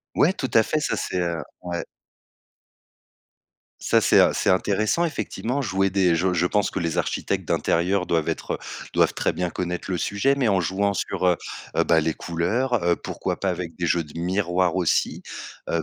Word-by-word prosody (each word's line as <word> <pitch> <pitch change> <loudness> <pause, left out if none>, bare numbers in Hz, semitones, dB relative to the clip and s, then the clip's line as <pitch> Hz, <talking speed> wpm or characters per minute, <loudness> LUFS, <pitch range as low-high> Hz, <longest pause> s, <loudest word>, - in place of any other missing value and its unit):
Ouais, 185 +6 +4
tout 130 - -3
à 110 - +6
fait, 155 - -1
ça 150 - -1
c'est, 90 - -2
heu, 85 -2 -1 0.2
ouais. 85 -1 -3 2.0
Ça 115 - +3
c'est, - - +4
heu, - - +6
c'est - - +1
intéressant 105 - +2
effectivement 140 -5 -2
jouer 95 -6 +1
des 90 -3 +3
je 90 +3 +1
je 90 0 +2
pense 105 +1 +1
que - - -3
les 85 -2 -1
architectes - - -1
d'intérieur 90 +2 +1
doivent 80 -2 0
être, - - -2
heu, - - -5 0.4
doivent - - +3
très - - 0
bien 90 -1 -2
connaître 90 +1 -4
le 90 - 0
sujet, 120 +11 +1
mais 130 -4 +1
en 95 -3 +3
jouant 100 +3 0
sur, 95 - -1
heu 90 -1 +4 0.4
heu, - - +3
bah 85 - +4
les 80 0 -1
couleurs, 110 +10 -1
heu, 85 - +4
pourquoi - - -4
pas 100 - 0
avec 85 -2 -5
des 85 -2 -1
jeux 85 0 +1
de 75 - -13
miroirs 90 0 0
aussi, 90 -3 +1 0.5
heu, 85 - 0
90 Hz, 195 wpm, -24 LUFS, 85-105 Hz, 2.0 s, à